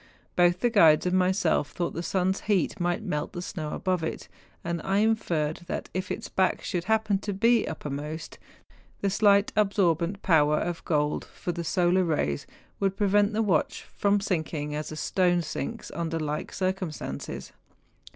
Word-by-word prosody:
Both 175 0 +3
the 240 - +2
guides 165 -8 +6
and 180 0 +1
myself 185 -5 +2
thought 175 -1 -2
the 170 - -3
sun's 190 +2 0
heat 200 -4 0
might 175 +4 0
melt 150 -7 -3
the 175 - -4
snow 155 -5 -5
above 185 -2 -1
it; 160 - -4 0.4
and 170 -1 -2
I 195 +1 +1
inferred 175 -8 +1
that - - -4
if 185 0 -3
its - - -4
back 190 -1 +1
should 175 -3 -2
happen 220 -2 +2
to 205 - -4
be 230 +3 +3
uppermost, 150 +1 -5 0.6
the 200 - +1
slight 200 0 +4
absorbent 195 -3 +1
power 150 -4 +4
of 175 +1 -3
gold 150 -2 0
for 175 - -5
the 170 0 -4
solar 180 +2 +2
rays 110 - -1 0.3
would 195 -1 0
prevent 205 +1 +3
the 220 +1 +1
watch 180 -7 0
from 200 0 +2
sinking 160 -6 -2
as 150 +1 -4
a - - -5
stone 175 +2 +1
sinks 230 +8 -5
under 165 -1 -2
like 150 -1 -3
cir¬ 185 0 0
cumstances. 180 -6 -6
180 Hz, 170 wpm, -27 LUFS, 160-200 Hz, 0.6 s, guides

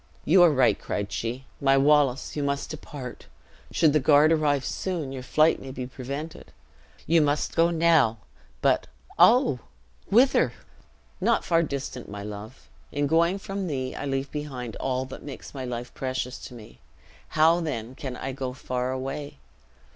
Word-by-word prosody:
"You 180 +4 +6
are 175 - +8
right," 130 -4 +3
cried 100 0 -3
she. 125 +3 -4 0.2
"My 135 -1 +4
Wallace, 140 -2 +3
you 150 - -1
must 140 0 -2
depart. 140 -4 -8 0.4
Should 155 -3 +3
the 155 - +4
guard 150 +2 +5
arrive 145 -4 +2
soon, 170 -8 -3
your 135 -1 -5
flight 155 +5 +3
may 135 - -8
be 130 -1 -5
prevented. 140 +5 -7 0.5
You 165 0 +4
must 145 0 0
go 165 0 +4
now 160 -9 +3 0.5
but, - - +2 0.3
oh! 240 - +5 0.5
whither?" 250 +6 +4 0.7
"Not - - +2
far 165 -1 +3
distant, 140 -5 -5
my 100 0 -7
love. 105 +4 -9 0.2
In 145 0 0
going 170 +5 +3
from 195 -1 -4
thee, 130 -4 -3
I - - -5
leave 135 0 -2
behind 130 -6 -5
all 130 0 -1
that 130 - -9
makes 145 -2 -9
my 130 -2 -5
life 120 -1 -5
precious 130 -1 -3
to 125 - -10
me; 105 - -13 0.6
how 165 +2 +5
then 125 -8 -4
can 130 -2 -6
I 135 - -4
go 130 -1 -4
far 125 -1 -3
away? 135 - -5
140 Hz, 160 wpm, -26 LUFS, 130-155 Hz, 0.7 s, are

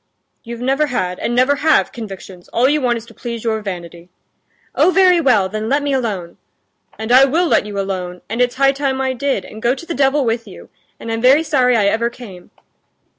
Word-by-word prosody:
"You've 235 0 -8
never 270 +4 +1
had, 180 -9 -3
and 240 - -2
never 260 +3 +3
have, 310 +1 +2
convictions; 195 -5 -10
all 245 +3 +1
you 300 +2 +1
want 240 -2 +1
is 225 - -9
to 235 - -16
please 235 -1 -6
your 220 -2 -1
vanity." 175 -3 -8 0.6
"Oh, - - +3
very 365 -2 +4
well; 220 -10 +3
then 215 +3 -4
let 285 +1 +1
me 285 -1 -1
alone!" 205 -10 -3 0.6
"And 220 +2 -4
I 260 +2 +7
will 325 +6 +1
let 215 - +1
you 205 -1 -5
alone! 180 -2 -4
and 230 +3 -2
it's 245 0 +1
high 275 +1 +4
time 275 -1 -2
I 265 -1 -1
did, 260 -6 -2
and 215 - -11
go 240 +3 +1
to 305 - -10
the 335 - -4
devil 275 -1 +2
with 230 0 -2
you! - - -13 0.3
and 225 - -6
I'm 225 0 -2
very 270 +6 +5
sorry 255 -6 +2
I 210 - +2
ever 225 +3 +1
came!" 210 -8 -12
240 Hz, 220 wpm, -18 LUFS, 210-275 Hz, 0.6 s, I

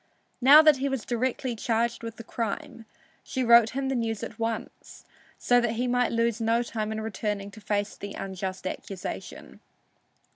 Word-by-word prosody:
Now 290 +5 +9
that 305 -3 +6
he 275 +2 -1
was 270 -5 -3
directly 245 +1 -1
charged 235 0 -1
with 230 -1 -6
the 230 - -9
crime, 225 0 -5 0.4
she 260 - -2
wrote 235 -1 +7
him 275 -1 -1
the 270 - 0
news 225 -3 -2
at 220 - -7
once, 225 0 -5 0.3
so 245 0 +3
that 235 -2 0
he 240 +2 -1
might 245 0 +1
lose 230 -1 0
no 230 +1 +2
time 220 -2 -3
in 220 0 -3
returning 205 -1 -3
to 215 - -13
face 205 0 -2
the 200 0 -8
unjust 190 -1 -5
accusation. 185 0 -7
230 Hz, 175 wpm, -27 LUFS, 215-245 Hz, 0.4 s, Now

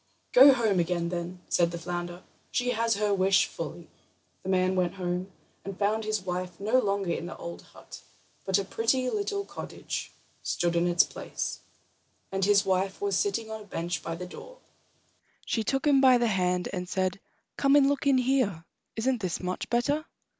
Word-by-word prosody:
"Go 270 +3 +9
home 225 -7 +2
again, 170 0 0
then," 175 +1 -5
said 170 -1 +2
the 170 - -5
flounder; 175 +1 -5 0.3
"she 245 0 0
has 230 -1 +1
her 205 0 +1
wish 190 0 +4
fully." - - -7 0.5
The 190 - -6
man 185 0 +2
went 180 0 0
home 180 0 -3 0.3
and 195 -1 -6
found 215 +2 0
his 215 -1 -1
wife 180 -1 -4
no 220 +6 +3
longer 200 -5 0
in 170 - -3
the - - -8
old 170 0 -7
hut, - - -13 0.4
but 190 0 +2
a 200 - -1
pretty 250 +5 0
little 405 -1 -2
cottage - - -6 0.3
stood 170 -1 0
in 170 +1 +2
its 175 0 +5
place, - - -5 0.7
and 195 0 -1
his 200 0 +4
wife 190 0 0
was 405 0 0
sitting 230 - -1
on 220 0 -5
a - - -12
bench 170 -4 -3
by 165 +2 -4
the 180 +2 -6
door. - - -11 0.9
She 225 - 0
took 270 +6 -1
him 280 -2 +5
by 260 -2 +7
the 240 - +1
hand, 180 -2 +1
and 180 -1 -4
said: 185 0 -1 0.4
"Come 275 0 +3
and 285 -1 +6
look 280 0 0
in 275 -2 +5
here—isn't 245 0 -1
this 180 -3 -2
much 185 0 -4
better?" 285 +6 +1
195 Hz, 180 wpm, -28 LUFS, 180-245 Hz, 0.9 s, Go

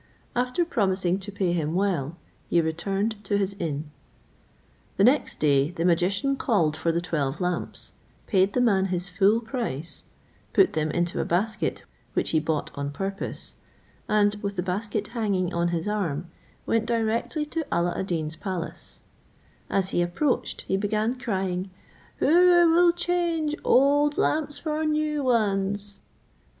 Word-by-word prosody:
After 250 +8 +1
promising 190 - +1
to 200 +1 -8
pay 190 -3 0
him 160 -1 -1
well, 175 -5 0 0.3
he 170 - +3
returned 195 +6 -1
to 205 +1 0
his 195 -1 -1
inn. 150 -2 -3 1.1
The 195 - +4
next 260 +7 +3
day 140 -1 +3
the 170 -1 -3
magician 190 +11 +2
called 170 - +1
for 165 - 0
the 165 - 0
twelve 150 -5 -2
lamps, 180 -2 -2 0.3
paid 195 0 +2
the 250 - +2
man 200 -6 +3
his 180 -1 -1
full 195 +4 +3
price, 220 - -4 0.5
put 385 - +4
them 155 0 0
into 175 +2 0
a - - 0
basket 210 +6 -1 0.3
which - - 0
he 160 - +3
bought 155 -1 -2
on 140 0 -3
purpose, 195 +7 -5 0.6
and 205 -1 +3
with 200 -1 -3
the 180 - -1
basket 205 +3 -2
hanging 200 -6 -1
on 170 0 +1
his 170 +1 -2
arm, 175 -6 -2 0.3
went 225 0 +1
directly 230 +6 0
to 320 +2 -3
Alla 175 0 +1
ad 190 - -3
Deen's 155 -3 -2
palace: 185 -3 -6 0.7
as 190 -1 +1
he 175 - +1
approached 180 +11 -1
he 190 - -1
began 215 +3 0
crying, 190 -4 -2 0.5
"Who 345 +2 +5
will 345 +1 +6
change 340 -3 0
old 290 +2 +4
lamps 300 -1 0
for 310 -1 -2
new 305 -1 0
ones?" 205 -4 0
195 Hz, 150 wpm, -26 LUFS, 175-240 Hz, 1.1 s, will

